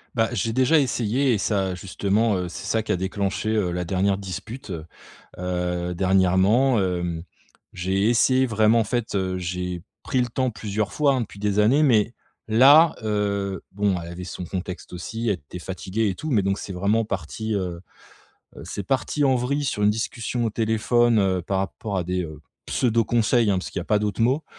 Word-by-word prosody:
Bah, 115 -1 +2
j'ai 110 +3 -1
déjà 130 +6 +4
essayé 125 0 +1
et - - +2
ça, 95 -2 0
justement, 100 +4 0
heu, 90 -1 -3
c'est - - -8
ça 110 - +1
qui 105 - -3
a 100 - +2
déclenché, 95 +3 -2
heu, 105 -5 +1
la 90 0 -2
dernière 95 +2 +1
dispute. 100 +5 -7 0.7
Heu, 90 -1 -2
dernièrement, 95 +7 +3
hem, 90 -3 -2 0.5
j'ai 95 +4 0
essayé 130 +2 +4
vraiment, 110 0 +3
en - - +3
fait, 120 +1 -2
heu, 95 -1 -1
j'ai 90 -1 -4 0.2
pris 130 - 0
le 125 - 0
temps 130 +2 -1
plusieurs 105 -1 -3
fois, 145 -2 +3
hein, 130 - 0
depuis 100 -3 -7
des 105 0 0
années 125 +9 +4
mais 115 -5 +3 0.3
là, 140 +9 +7
heu 100 -3 -1
bon 100 0 +1
elle 85 - -8
avait 90 +1 -7
son 90 - -6
contexte 90 +1 -6
aussi, 115 +6 -4
elle 100 - +2
était 85 +2 -10
fatiguée 95 +4 -2
et 95 - -3
tout. 155 +10 -5
Mais 110 -5 +3
donc 100 +1 0
c'est 95 - -6
vraiment 100 +5 +1
parti, 105 +3 -4
heu 90 -3 -3 0.8
heu, - - -9
c'est 100 - -5
parti 135 +4 0
en 135 -1 +4
vrille 140 +4 -1
sur 105 -6 -1
une 105 - +5
discussion 115 +2 -2
au 115 - 0
téléphone, 115 +1 +2
heu, 95 -3 +1
par 95 +3 -1
rapport 95 +1 -3
à 90 - -2
des, 90 +1 -1
heu, 80 -3 -8 0.3
pseudos 115 -2 +1
conseils, 115 -1 +2
hein, 95 - +2
parce 90 - -6
qu'il - - -3
y - - -4
a - - -11
pas 105 - +2
d'autre 105 -1 -2
mot. 130 +7 +2
105 Hz, 200 wpm, -24 LUFS, 95-115 Hz, 0.8 s, là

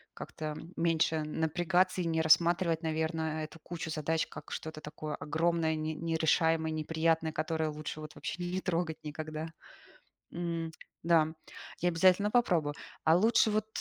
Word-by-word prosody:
как-то, 155 - -7
м, 170 +3 -11
меньше 160 -1 +2
напрягаться 175 +4 +1
и 175 - -2
не 160 -1 +1
рассматривать, 170 +1 +4
наверно, 160 0 -1
эту 155 +1 -9
кучу 165 -2 -5
задач 160 +1 0
как - - -10
что-то 155 -1 -5
такое 150 0 -6
огромное, 160 +1 0
не 155 0 -2
нерешаемое, 160 0 +2
неприятное, 160 +1 +1
которое 155 0 -1
лучше 155 0 -6
вот 155 -1 -9
вообще 175 - -5
не 180 +2 -2
трогать 170 -3 -1
никогда. 155 +1 -5 0.8
М, 165 -1 -3 0.3
да, 165 -2 +4 0.5
я 175 - +3
обязательно 185 +4 +4
попробую. 175 -12 +2 0.3
А 160 +1 +6
лучше 220 +3 +4
вот 215 0 0
160 Hz, 145 wpm, -31 LUFS, 155-170 Hz, 0.8 s, А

